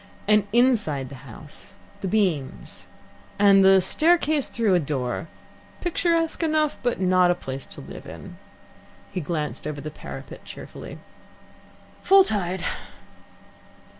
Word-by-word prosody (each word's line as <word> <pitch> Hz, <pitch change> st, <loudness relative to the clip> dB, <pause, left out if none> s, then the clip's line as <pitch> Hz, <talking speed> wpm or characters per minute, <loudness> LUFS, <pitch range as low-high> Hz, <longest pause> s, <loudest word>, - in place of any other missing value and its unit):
And, 210 Hz, -1 st, +4 dB
inside 210 Hz, -, +2 dB
the 135 Hz, -1 st, -11 dB
house, 150 Hz, -, -9 dB, 0.2 s
the 195 Hz, -, -3 dB
beams 180 Hz, -10 st, -1 dB, 0.5 s
and 200 Hz, -1 st, +6 dB
the 190 Hz, 0 st, +7 dB
staircase 310 Hz, -, +2 dB
through 225 Hz, -5 st, +1 dB
a 180 Hz, -, +5 dB
door 140 Hz, -1 st, -3 dB, 0.5 s
picturesque 335 Hz, -2 st, 0 dB
enough, 310 Hz, -2 st, +1 dB
but 245 Hz, -1 st, 0 dB
not 185 Hz, -1 st, +4 dB
a 175 Hz, -, +3 dB
place 135 Hz, -5 st, -6 dB
to -, -, -10 dB
live -, -, -10 dB
in." -, -, -10 dB, 0.7 s
He 180 Hz, -, -3 dB
glanced 150 Hz, -2 st, -3 dB
over 150 Hz, -1 st, -4 dB
the 150 Hz, +2 st, -6 dB
parapet -, -, -9 dB
cheerfully. -, -, -9 dB, 1.0 s
"Full 390 Hz, 0 st, +7 dB
tide. 190 Hz, -, -2 dB
190 Hz, 125 wpm, -24 LUFS, 150-245 Hz, 1.0 s, the